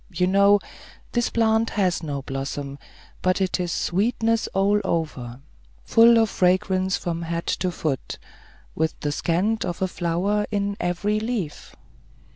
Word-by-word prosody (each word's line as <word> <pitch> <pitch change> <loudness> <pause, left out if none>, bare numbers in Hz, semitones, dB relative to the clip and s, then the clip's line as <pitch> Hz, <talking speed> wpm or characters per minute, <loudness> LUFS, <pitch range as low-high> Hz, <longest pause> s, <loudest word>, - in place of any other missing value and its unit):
You 180 -1 0
know, 200 +2 +5 0.5
this 240 -1 +1
plant 225 0 +2
has 185 -5 0
no 145 -4 -4
blossom; 135 +1 -5 0.4
but 185 +1 +1
it 190 -1 0
is 175 -1 -2
sweetness 225 +6 0
all 200 +2 +2
over, 135 -7 -3 0.4
full 230 +1 +6
of 225 -1 +4
fragrance 185 +1 +2
from 170 -1 -3
head 170 0 -3
to 185 - -1
foot, 150 -6 -3 0.6
with 160 +1 -1
the 145 - -1
scent 185 +9 0
of 175 - -4
a 190 - +1
flower 185 +5 -1
in 200 -1 -1
every 200 +5 0
leaf. 215 -9 -4
185 Hz, 140 wpm, -24 LUFS, 165-210 Hz, 0.6 s, full